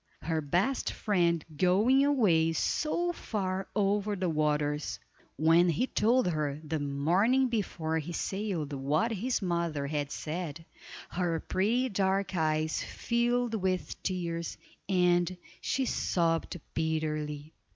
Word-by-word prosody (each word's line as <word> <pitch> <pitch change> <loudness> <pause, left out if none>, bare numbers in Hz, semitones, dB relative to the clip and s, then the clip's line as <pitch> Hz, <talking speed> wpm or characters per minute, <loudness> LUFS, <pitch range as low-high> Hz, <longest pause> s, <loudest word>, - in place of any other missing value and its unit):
Her 160 -1 0
best 180 - 0
friend 170 -6 +1
going 210 - +4
away 190 - +3
so 345 - 0
far 190 - -3
over 205 0 +1
the 185 -2 -1
waters. 150 -1 0 0.4
When 165 +4 +4
he 170 - +1
told 245 -2 +2
her 150 -3 -1
the 155 0 -2
morning 180 - +2
before 165 -8 -1
he 160 +3 -6
sailed 180 -4 -2
what 145 - 0
his 225 +2 -1
mother 170 -5 -1
had 145 -1 -2
said, 165 0 -5 0.5
her 170 -2 0
pretty 230 +10 +1
dark 195 -1 0
eyes 155 -1 +1
filled 240 0 0
with 185 -4 -2
tears, 170 -3 -3 0.3
and 180 -1 +2 0.2
she 265 - 0
sobbed 170 -5 0
bitterly. 155 -1 -2
175 Hz, 120 wpm, -30 LUFS, 155-205 Hz, 0.5 s, going